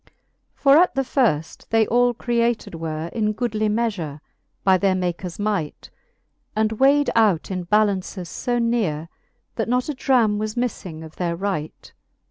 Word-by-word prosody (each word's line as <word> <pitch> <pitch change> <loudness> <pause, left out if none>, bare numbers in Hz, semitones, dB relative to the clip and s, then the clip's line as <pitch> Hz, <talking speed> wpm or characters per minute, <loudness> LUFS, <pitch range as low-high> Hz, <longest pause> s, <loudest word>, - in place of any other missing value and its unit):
XXXV. - - -30 0.4
For 280 0 +5
at 355 -1 +4
the 270 - +1
firft 225 - 0
they 225 -1 +3
all 245 +1 +2
created 235 -2 0
were 160 0 -4
In 215 -2 0
goodly 215 -2 -1
meafure, 205 -10 -2 0.4
by 190 -1 +5
their 195 -1 +2
Maker's 180 -1 -3
might, 205 -7 -3 0.6
And 215 0 +1
weighed 275 +5 +3
out 210 -7 +2
in 185 -2 -3
ballaunces 200 -3 +1 0.2
fb 240 -1 +2
nere, 185 -10 -1 0.5
That - - -1
not 250 +3 0
a - - 0
dram 240 -6 +2
was 215 0 -3
miffing 185 -9 -3
of 160 - -14
their 170 -2 -1
right. 180 -4 -4
215 Hz, 155 wpm, -22 LUFS, 175-240 Hz, 0.6 s, For